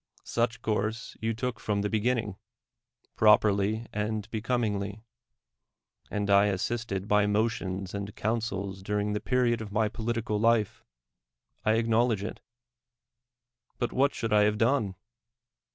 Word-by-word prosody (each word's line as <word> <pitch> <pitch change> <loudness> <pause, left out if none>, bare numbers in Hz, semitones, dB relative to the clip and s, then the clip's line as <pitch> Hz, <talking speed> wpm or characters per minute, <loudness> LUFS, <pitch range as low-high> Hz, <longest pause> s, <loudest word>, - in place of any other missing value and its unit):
Such 120 +1 -1
course 110 +2 -2
you 115 0 -1
took 125 0 -3
from 100 -1 -1
the - - +1
beginning, 110 -1 0 0.8
properly 105 +1 +4
and 105 0 -2
becomingly; 105 -3 -1 1.1
and 105 -1 -2
I 100 0 +5
assisted 100 0 -2
by 105 -1 +3
motions 105 -3 -1
and 100 0 -5
counsels 100 -4 -2
during 105 +1 -1
the 105 - -1
period 125 -2 +1
of 105 -2 -7
my 105 0 +1
political 115 -1 -2
life: 115 -2 +2 0.4
— - - -44
I 110 - +5
acknowledge 115 -1 +2
it. 105 - -5 1.4
But 120 - -1
vchat 140 +2 +2
should 115 -1 -2
I 105 - +6
have 105 0 +1
done? 115 -4 +1
105 Hz, 130 wpm, -28 LUFS, 100-115 Hz, 1.4 s, I